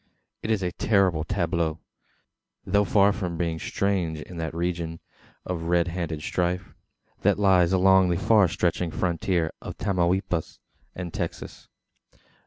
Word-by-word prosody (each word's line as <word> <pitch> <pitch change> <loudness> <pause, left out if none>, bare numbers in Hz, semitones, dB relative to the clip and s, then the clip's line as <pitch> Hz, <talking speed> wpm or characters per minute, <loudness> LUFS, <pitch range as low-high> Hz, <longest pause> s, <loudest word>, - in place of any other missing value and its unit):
It - - -5
is 110 -4 +1
a 90 - -1
terrible 95 -6 +2
tableau; 85 -3 -1 0.9
though 100 +2 +2
far 100 0 +4
from 90 -5 -4
being 85 -1 -1
strange 90 -6 -1
in 90 +3 -9
that 80 0 -4
region 85 -1 -2 0.5
of 85 -2 -4
red 85 0 +2
handed 85 -3 -4
strife, 90 +1 -2 0.5
that - - +3
lies 95 -4 +4
along 95 0 +5
the 85 - +1
far 105 0 +4
stretching 85 +1 -1
frontier 85 -1 0
of - - -7
Tamaulipas 90 -3 0 0.4
and 90 -2 -6
Texas. - - -5
90 Hz, 135 wpm, -25 LUFS, 85-95 Hz, 0.9 s, along